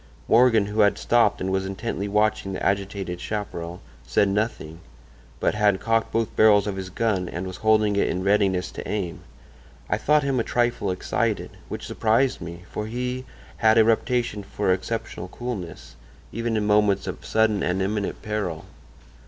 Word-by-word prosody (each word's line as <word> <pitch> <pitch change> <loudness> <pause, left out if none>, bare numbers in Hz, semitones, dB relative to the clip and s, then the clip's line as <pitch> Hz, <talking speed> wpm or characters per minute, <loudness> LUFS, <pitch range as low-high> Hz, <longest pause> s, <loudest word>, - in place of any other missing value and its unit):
"Morgan, 115 -3 +5
who 105 +2 -4
had 105 -1 +4
stopped 115 -3 +3
and 95 0 -2
was 95 0 0
intently 100 +1 -3
watching 105 -1 +1
the - - -4
agitated 95 -3 -2
chaparral, 90 -4 -5 0.2
said 65 +11 +2
nothing, 95 -6 -2 0.6
but - - +1
had 105 -2 +2
cocked 115 0 0
both 115 -1 -1
barrels 105 -2 +5
of 100 -2 -2
his 95 -1 -5
gun 95 -2 -1
and 90 +2 -4
was 95 -1 -6
holding 110 -1 +3
it 100 - +2
in 95 - -2
readiness 95 -3 +2
to - - -7
aim. 95 -5 -3 0.7
I - - +3
thought 150 0 +3
him 135 -2 0
a - - +1
trifle 120 -4 0
excited, 110 +4 -1 0.2
which - - -5
surprised 115 +4 +1
me, 85 +1 -8
for 105 - -4
he 125 +2 -3 0.3
had 110 +5 +4
a 110 - +6
reputation 115 -1 +1
for 100 -1 0
exceptional 110 +2 -4
coolness, 90 - -7 0.4
even 115 0 -1
in 105 - 0
moments 105 -1 +3
of - - -6
sudden 110 -2 +2
and 90 +2 0
imminent 100 +1 -2
peril. 105 -7 -3
105 Hz, 170 wpm, -24 LUFS, 95-115 Hz, 0.7 s, a